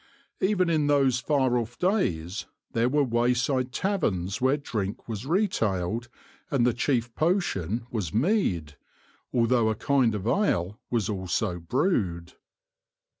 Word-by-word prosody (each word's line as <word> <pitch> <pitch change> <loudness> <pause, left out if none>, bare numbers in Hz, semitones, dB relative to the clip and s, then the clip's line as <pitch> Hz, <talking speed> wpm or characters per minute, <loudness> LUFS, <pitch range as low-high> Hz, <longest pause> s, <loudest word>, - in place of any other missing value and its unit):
Even 190 -2 +2
in 155 -3 +2
those 135 -3 +3
far 130 -2 +2
off 120 +1 -6
days 95 - 0 0.2
there 115 +2 +2
were 145 +2 +3
wayside 125 +1 +1
taverns 115 - -1
where 130 +3 +3
drink 105 -8 -4
was 115 +2 -5
retailed 115 - 0 0.4
and 135 -7 +2
the 125 - +3
chief 120 -1 0
potion 120 - 0
was 100 -9 -2
mead, 105 - 0 0.5
although 115 -1 +3
a 110 - 0
kind 125 -2 +2
of 100 -1 -4
ale 110 - +1
was 115 -5 0
also 95 -3 -2
brewed. 90 - -1
120 Hz, 125 wpm, -27 LUFS, 100-145 Hz, 0.5 s, those